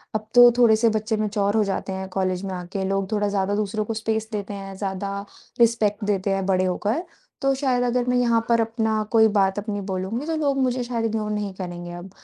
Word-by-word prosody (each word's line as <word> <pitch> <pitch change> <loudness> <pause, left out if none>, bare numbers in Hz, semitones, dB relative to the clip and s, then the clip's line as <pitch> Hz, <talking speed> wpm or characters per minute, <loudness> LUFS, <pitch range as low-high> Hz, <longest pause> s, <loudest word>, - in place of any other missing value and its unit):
अब 215 0 -2
तो 245 0 +10
थोड़े 235 -3 +6
से 230 +1 +3
बच्चे 220 0 -1
मैच्योर 205 -1 0
हो 220 - +4
जाते 195 -1 -3
हैं 190 0 -5
कॉलेज 185 0 -1
में 190 - -4
आके 180 +2 -4
लोग 195 +1 -1
थोड़ा 205 -1 +1
ज़्यादा 200 0 0
दूसरों 215 0 -1
को 225 - -3
स्पेस 220 0 -2
देते 205 -1 -4
हैं, 195 -1 -7
ज़्यादा 200 +1 -4 0.3
रिस्पेक्ट 225 -3 +2
देते 200 -1 0
हैं 195 -1 0
बड़े 185 -1 +2
होकर। 210 - -1 0.4
तो 275 0 +3
शायद 260 -3 +1
अगर 245 0 +1
मैं 250 - +2
यहाँ 235 -2 +3
पर 230 -1 +4
अपना 220 -1 0
कोई 220 -1 +6
बात 195 -2 +2
अपनी 205 -1 -4
बोलूँगी 190 +8 -3
तो 325 0 -1
लोग 285 -3 0
मुझे 250 -1 0
शायद 235 -2 -2
इग्नोर 215 -1 -1
नहीं 205 -2 -3
करेंगे 175 -2 -6
अब। 175 +2 -8
210 Hz, 220 wpm, -23 LUFS, 195-230 Hz, 0.4 s, तो